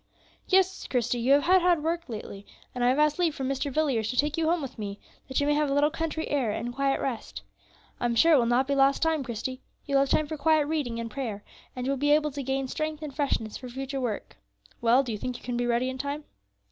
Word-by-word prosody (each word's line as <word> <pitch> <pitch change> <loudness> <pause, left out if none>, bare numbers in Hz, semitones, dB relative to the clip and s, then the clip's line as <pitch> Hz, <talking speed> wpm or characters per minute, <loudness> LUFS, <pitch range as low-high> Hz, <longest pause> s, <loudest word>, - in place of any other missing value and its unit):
"Yes, 380 0 +2
Christie; 245 -1 0
you 250 +4 +4
have 285 0 +4
had 370 +1 +5
hard 345 -3 +3
work 335 -1 -2
lately, 210 -3 -7 0.3
and 245 - -2
I 245 - +5
have 260 - +2
asked 300 +2 +2
leave 335 -4 +2
from 265 - -3
Mr. 275 +1 -2
Villiers 260 -7 +1
to 250 - -3
take 295 +2 +2
you 325 -1 0
home 345 +1 +2
with 265 -5 -7
me, 200 -1 -5 0.3
that 265 - -1
you 285 - +1
may 295 - +3
have 295 -1 +1
a - - +1
little 295 +1 +3
country 320 0 -3
air 275 -6 +1
and 240 +3 -3
quiet 275 +1 +1
rest. 215 - -4 0.6
I - - -1
am 235 -1 +1
sure 330 +8 +6
it 290 - +6
will 235 - +2
not 250 +3 +2
be 280 - +1
lost 275 +2 +3
time, 320 -3 +1
Christie; 255 +2 -5 0.2
you 280 - -4
will 275 - +5
have 275 - +1
time 310 - +2
for 310 +1 -5
quiet 310 0 +3
reading 290 -7 -2
and 230 -1 -5
prayer, 215 -5 -4 0.3
and 250 -1 -4
you 270 - 0
will 275 - 0
be 290 +2 +3
able 300 0 0
to 280 +1 -5
gain 270 0 -1
strength 310 +3 -3
and 285 -3 -6
freshness 250 -7 -1
for 255 - -9
future 270 +2 -4
work. 230 -5 -4 0.4
Well, 240 +3 +4
do 245 - -4
you 210 - -4
think 250 +2 -4
you - - -18
can 245 0 -3
be 240 0 0
ready 240 +1 +1
in 260 0 -4
time?" 285 +2 -3
275 Hz, 270 wpm, -27 LUFS, 245-300 Hz, 0.6 s, sure